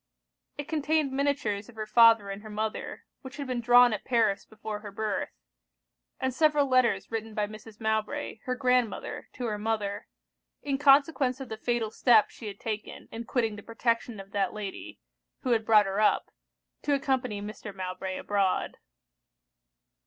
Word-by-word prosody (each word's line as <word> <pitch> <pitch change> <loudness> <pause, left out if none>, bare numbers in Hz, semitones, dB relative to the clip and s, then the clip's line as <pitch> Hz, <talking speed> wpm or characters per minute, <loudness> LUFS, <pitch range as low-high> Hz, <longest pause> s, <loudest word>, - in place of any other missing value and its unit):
It 290 - -5
contained 310 -2 +1
miniatures 265 -7 -1
of 240 - -14
her 215 -1 -4
father 225 -2 +5
and 195 +1 -6
her 215 - -10
mother, 215 +1 -4 0.2
which 265 +1 -10
had 285 - -4
been 250 -2 -2
drawn 245 0 +6
at 210 - -4
Paris 225 -5 +1
before 215 -1 -6
her 210 -1 -9
birth; 210 0 -2 0.9
and 260 -1 -1
several 300 0 +3
letters 250 -8 +2
written 225 -1 -4
by 210 - +1
Mrs. 215 +1 -12
Mowbray, 220 +4 -2
her 255 - -1
grandmother, 250 -3 0
to 250 - -5
her 210 -2 -2
mother, 210 -2 -2 0.6
in 275 -2 -1
consequence 280 -2 +4
of 270 - -7
the 220 - -4
fatal 235 -1 -1
step 225 -3 +4
she 220 - -9
had 200 - -7
taken 215 -2 -5
in 230 +1 -6
quitting 225 -3 -1
the - - -8
protection 230 0 -1
of 195 0 -10
that 195 -2 0
lady, 205 -2 -7 0.4
who 255 - -1
had 225 -2 +3
brought 215 -2 +6
her 195 +1 -2
up, 215 - +2 0.5
to 290 - +1
accompany 265 -6 -1
Mr. 210 0 -7
Mowbray 185 0 -5
abroad. 200 -2 0
225 Hz, 165 wpm, -28 LUFS, 210-255 Hz, 0.9 s, drawn